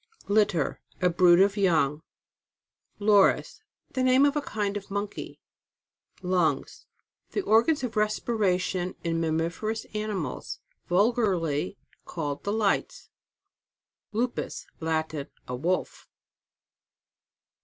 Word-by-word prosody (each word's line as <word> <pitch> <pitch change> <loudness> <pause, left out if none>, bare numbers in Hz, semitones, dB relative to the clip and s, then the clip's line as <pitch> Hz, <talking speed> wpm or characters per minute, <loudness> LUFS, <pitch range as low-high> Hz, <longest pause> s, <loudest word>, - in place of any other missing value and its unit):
LITTER. 200 -7 +1 0.2
A 180 -1 +3
brood 175 0 +6
of 200 +1 +3
young. 160 -7 +2 1.0
LOR 205 -1 +6
IP. - - -3 0.5
The 260 - -1
name 255 +1 +5
ofa 290 +1 +1
kind 205 -4 -2
of 200 -1 -6
monkey. 200 +1 -5 0.8
LUNGS. 180 -3 0 0.5
The 405 - 0
organs 235 +6 +3
of 240 -3 -3
respiration 200 -4 0
in 165 -1 0
mammiferous 165 +7 -1
animals. 210 -2 -4 0.3
Vulgarly 185 -5 +1 0.3
called 145 -4 -4
the 200 - -1
lights. 210 -2 -1 1.0
LUPUS. 240 +3 -2
Latin. 160 -3 -2 0.2
A 125 - -3
Wolf. 175 +8 -2
195 Hz, 100 wpm, -27 LUFS, 165-215 Hz, 1.0 s, brood